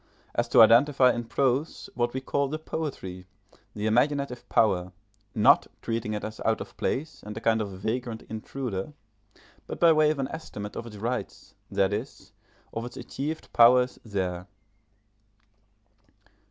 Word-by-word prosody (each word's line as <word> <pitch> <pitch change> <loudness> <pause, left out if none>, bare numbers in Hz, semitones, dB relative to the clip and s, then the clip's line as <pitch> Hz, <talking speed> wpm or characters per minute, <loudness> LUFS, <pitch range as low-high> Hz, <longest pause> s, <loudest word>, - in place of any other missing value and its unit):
as 120 - 0
to 115 - +8
identify 125 +3 +5
in 120 - -3
prose 130 +5 -1
what 120 -1 0
we 130 - -3
call 140 +1 -1
the 155 +3 -3
poetry, 110 - -5 0.5
the 105 0 -3
imaginative 125 +2 +1
power, 95 -4 +2 0.4
not 105 - +5
treating 115 -2 -2
it 105 - -4
as 110 0 -6
out 110 0 +1
of - - -8
place 145 +1 -3
and 105 +1 -8
a - - -2
kind 115 -1 +2
of 105 - -3
vagrant 110 +4 -4
intruder, 110 +1 -5 0.7
but - - -6
by 170 -1 +6
way 155 -1 +4
of 155 - 0
an 135 -1 -1
estimate 105 -10 -7
of 120 - -5
its 105 -2 -10
rights, 120 +4 -4 0.2
that 95 0 +1
is, 115 +7 -6 0.4
of 115 - -3
its 120 - -8
achieved 155 +4 -5
powers, 125 +2 +5
there. 95 -4 -3
120 Hz, 155 wpm, -27 LUFS, 105-135 Hz, 0.7 s, to